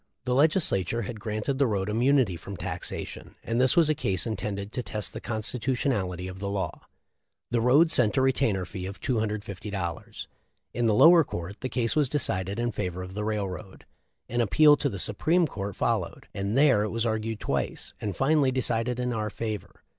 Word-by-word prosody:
The 125 - +1
Legislature 125 - +2
had 110 +2 -6
granted 110 +5 -2
the 140 - +4
road 100 -3 -1
immunity 120 -2 +2
from 95 +4 -8
taxation, 90 0 -6
and 115 +2 0
this 130 +4 +5
was 170 -3 +5
a 155 - +3
case 95 -11 -1
intended 100 -2 -4
to 125 - -3
test 105 -3 -4
the 110 - -6
constitutionality 110 - -2
of 95 0 -8
the 100 0 -3
law. 100 -1 -3 0.7
The 120 -1 +2
road 145 +8 +5
sent 120 0 +2
a - - +4
retainer 120 -8 +1
fee 90 0 -6
of 100 0 -8
$250. 100 - -3 0.5
In 120 -1 +1
the 110 - +3
lower 165 +6 +8
court 90 - -6
the 130 - -3
case 120 0 0
was 150 -4 +2
decided 100 -9 -1
in 120 0 0
favor 90 -3 -3
of 90 +1 -9
the 105 +1 -3
railroad. 100 -2 -4 0.4
An 120 +1 0
appeal 150 +7 +6
to 140 - 0
the 100 - -5
Supreme 160 - +2
Court 100 - -5
followed, - - -1
and 100 +4 -2
there 135 -7 +5
it 105 - -1
was 115 +2 -1
argued 110 -1 -2
twice, - - -3
and 105 -3 -3
finally 140 -1 +3
decided 125 -1 0
in 125 0 -1
our 110 -1 -2
favor. 110 -2 -6
110 Hz, 185 wpm, -27 LUFS, 100-130 Hz, 0.7 s, lower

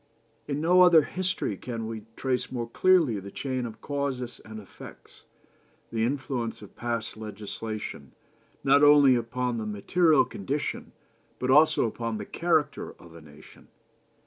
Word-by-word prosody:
In 145 0 -2
no 175 +4 +4
other 175 -4 +7
history 185 - -2
can 115 0 -5
we 110 -1 -6
trace 125 -1 -2
more 120 -2 -3
clearly 160 - +3
the 100 +1 -9
chain 130 +2 -3
of 110 -1 -11
causes 140 -4 -3
and 110 0 -9
effects, 100 - -14 0.7
the 115 -1 0
influence 125 -4 -3
of 100 - -14
past 120 -2 -4
legislation, 110 0 -7 0.5
not 140 +1 +5
only 145 -2 +7
upon 125 0 -1
the 110 - -4
material 155 - +3
condition, 140 +10 -4 0.5
but 130 0 0
also 150 0 +5
upon 115 0 -3
the - - -6
character 165 -3 0
of 85 -1 -15
a 85 - -12
nation. 75 0 -17
125 Hz, 145 wpm, -27 LUFS, 110-145 Hz, 0.7 s, other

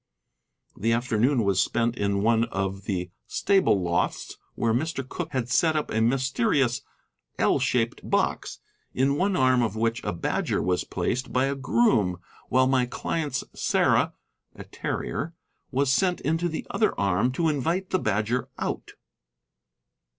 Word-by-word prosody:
The 115 +3 +1
afternoon 120 +2 +2
was 100 -2 +2
spent 120 0 0
in 100 -2 0
one 115 +1 +3
of 95 -1 -3
the 90 -3 -3 0.2
stable 190 - +2
lofts, 85 -1 -1 0.2
where 115 -1 +1
Mr. 140 +1 -2
Cooke - - -5
had 125 -3 -1
set 155 +6 +2
up 150 - -1
a 110 - +1
mysterious 125 0 +1 0.6
L - - +3
shaped 120 -1 -1
box, - - 0 0.4
in 135 +2 +2
one 190 +5 +1
arm 130 -3 +4
of 110 -3 -1
which 115 +1 -1
a 105 - -1
badger 85 - -1
was 90 0 0
placed 130 +2 -2
by 130 +1 +2
a 135 - 0
groom, 130 - +2 0.3
while 130 0 +4
my 130 -1 +2
client's 145 +1 -2
Sarah, - - +2 0.4
a - - -9
terrier, 160 +4 -4 0.3
was 135 0 +1
sent 180 +3 +2
into 165 +4 0
the 160 - -5
other 220 - +1
arm 100 +5 +2
to 165 +4 +1
invite 165 +6 -1
the 185 - +2
badger 110 - -1
out. - - -4
125 Hz, 150 wpm, -26 LUFS, 110-140 Hz, 0.6 s, arm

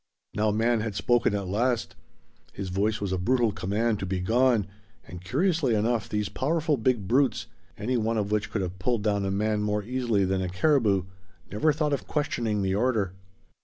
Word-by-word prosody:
Now 110 +1 +1
man 115 +2 +2
had 110 -2 -3
spoken 120 -1 +2
at 100 -2 -3
last; 115 +5 0 0.6
his 95 -1 -5
voice 105 +4 0
was 100 -2 -3
a 95 - -1
brutal 120 +3 +2
command 105 +3 -1
to 95 - -4
be 95 0 -2
gone, 115 +2 +2 0.4
and 90 +1 -9
curiously 145 - +1
enough 110 0 0
these 105 -1 -1
powerful 155 +5 0
big 115 -5 0
brutes, 130 +5 +2 0.3
any 125 +4 -1
one 115 0 0
of 105 -1 -1
which 105 0 0
could 105 -2 -2
have 90 0 -6
pulled 115 +1 0
down 100 -2 +1
a - - -1
man 105 +2 0
more 105 0 -1
easily 120 -4 0
than 95 0 0
a 90 - -2
caribou, 105 - +2 0.5
never 110 +11 +2
thought 150 0 0
of 140 - -3
questioning 115 -9 -1
the 95 0 0
order. 105 -4 +1
110 Hz, 190 wpm, -27 LUFS, 100-125 Hz, 0.6 s, man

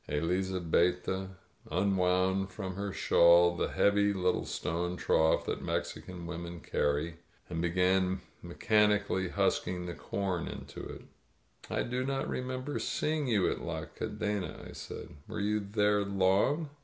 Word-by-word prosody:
Elizabetta 90 +3 0 0.4
unwound 95 +1 +2
from 95 -1 -5
her 100 +1 -3
shawl 85 -2 +5
the - - 0
heavy 100 0 +3
little 90 -2 0
stone 90 +2 -2
trough 80 -2 +3
that - - -2
Mexican 90 -2 -4
women 85 0 -6
carry, 75 +3 -1 0.3
and 85 -1 -1
began 90 +2 +2 0.2
mechanically 105 0 +2
husking 90 0 0
the 85 - -4
com 90 +1 -2
into - - -8
it. - - -8 0.7
"I - - 0
do 125 +1 -2
not 135 0 -1
remember 130 +2 -3
seeing 155 -2 -1
you 105 -6 +3
at - - -4
La - - -4
Cadena," 105 -3 -4
I - - -10
said. - - -8 0.2
"Were 110 0 -5
you 105 +1 +1
there 105 0 +2
long?" 100 - +2
95 Hz, 130 wpm, -31 LUFS, 85-105 Hz, 0.7 s, shawl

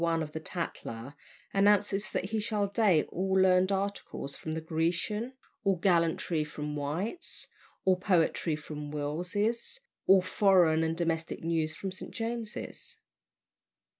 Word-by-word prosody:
1 165 -1 +2
of 150 - -7
the 160 - -4
Tatler, 140 -7 -5 0.4
announces 205 0 +3
that 190 +3 -2
he 220 - +1
shall 210 -1 0
date 200 -6 +3
all 190 +2 -1
learned 185 0 +5
articles 195 -7 -3
from 160 - -5
the 160 - -2
"Grecian," 170 +9 -1 0.3
all 195 -1 +3
gallantry 170 -2 +2
from 150 0 -5
"White's," 160 - -2 0.4
all 185 -1 +5
poetry 175 -3 +2
from 150 -1 -7
"Wills's," 180 - -2 0.3
all 190 -1 +7
foreign 180 -4 +4
and 160 0 -1
domestic 165 -2 -1
news 160 -1 0
from 195 - -4
"St. 185 - -6
James's." 225 -1 -5
180 Hz, 135 wpm, -30 LUFS, 160-200 Hz, 0.4 s, all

